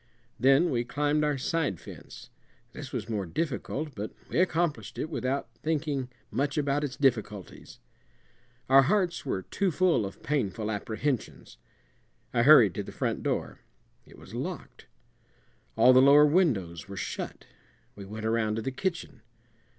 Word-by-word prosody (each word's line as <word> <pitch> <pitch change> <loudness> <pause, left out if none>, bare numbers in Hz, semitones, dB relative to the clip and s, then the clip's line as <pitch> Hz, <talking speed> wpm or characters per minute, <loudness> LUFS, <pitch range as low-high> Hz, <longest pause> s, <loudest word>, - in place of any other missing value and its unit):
Then 135 +6 +4
we 120 -2 0
climbed 145 +4 0
our 150 -2 +1
side 140 - -1
fence. - - -12 0.4
This 145 -2 -8
was 120 -7 -4
more 105 -5 -3
difficult, 150 - -3
but 105 0 -5 0.2
we - - 0
accomplished 155 - 0
it 155 - -4
without 135 -3 -2
thinking 145 -4 -1 0.2
much 140 +2 -1
about 145 0 0
its 140 -2 -4
difficulties; 110 - -2 0.9
our 135 +1 +7
hearts 175 0 0
were 95 -7 -2
too 195 - -1
full 175 -8 +2
of 95 - -12
painful 110 -6 -1
apprehensions. 110 - -4 0.7
I 120 - +3
hurried 120 - +7
to - - -3
the - - -9
front - - -2
door; - - -2 0.5
it - - -16
was - - -14
locked. - - -6 0.9
All 130 - +6
the 130 - +7
lower 145 +2 +7
windows 120 - +1
were 100 0 -8
shut. - - -5 0.5
We 100 - -9
went 110 +2 -7
around 110 -1 +1
to 110 - -3
the 135 - -2
kitchen. 165 - -4
135 Hz, 150 wpm, -28 LUFS, 110-150 Hz, 0.9 s, our